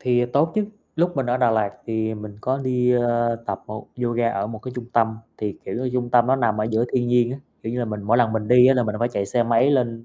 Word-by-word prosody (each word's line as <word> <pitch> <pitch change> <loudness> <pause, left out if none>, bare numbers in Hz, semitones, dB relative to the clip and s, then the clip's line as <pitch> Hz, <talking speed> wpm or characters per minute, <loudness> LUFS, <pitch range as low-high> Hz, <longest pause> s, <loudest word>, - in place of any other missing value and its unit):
Thì, 125 -1 +2
à, - - 0
tốt 155 +4 +2
chứ, 215 -1 +1 0.3
lúc 175 0 +1
mình 135 - 0
ở 120 +1 +1
Đà 125 -2 +3
Lạt 110 -3 +1 0.2
thì 110 -1 -1
mình 105 -1 -9
có 130 +3 -1
đi, 125 -2 +1
ờ, 120 -1 +1
tập 100 -2 -4
một 110 +1 -8 0.2
yoga 120 -1 +1
ở 100 -2 -2
một 110 0 -7
cái 125 +3 -8
trung 125 -1 -5
tâm, 110 -1 +1 0.2
thì, 105 -2 -4
kiểu 95 - -5
như, 125 +1 -2
trung 125 -1 -2
tâm 120 0 +4
nó 130 - +3
nằm 105 -5 +1
ở - - +1
giữa 110 +1 +1
thiên 120 -1 +1
nhiên 120 0 +3
á, 135 - -6 0.2
kiểu 110 - -4
như 125 - -3
là, 120 - 0
mình 105 -2 -5
mỗi 105 +4 +2
lần 120 -3 +3
mình 110 -1 -2
đi 125 0 +7
á 135 - +5
là 125 - +2
mình 105 -2 -2
phải 120 +2 +1
chạy 100 -4 -2
xe 120 +2 +1
máy 115 +4 +3
lên, 120 -4 0
120 Hz, 300 wpm, -22 LUFS, 110-125 Hz, 0.3 s, đi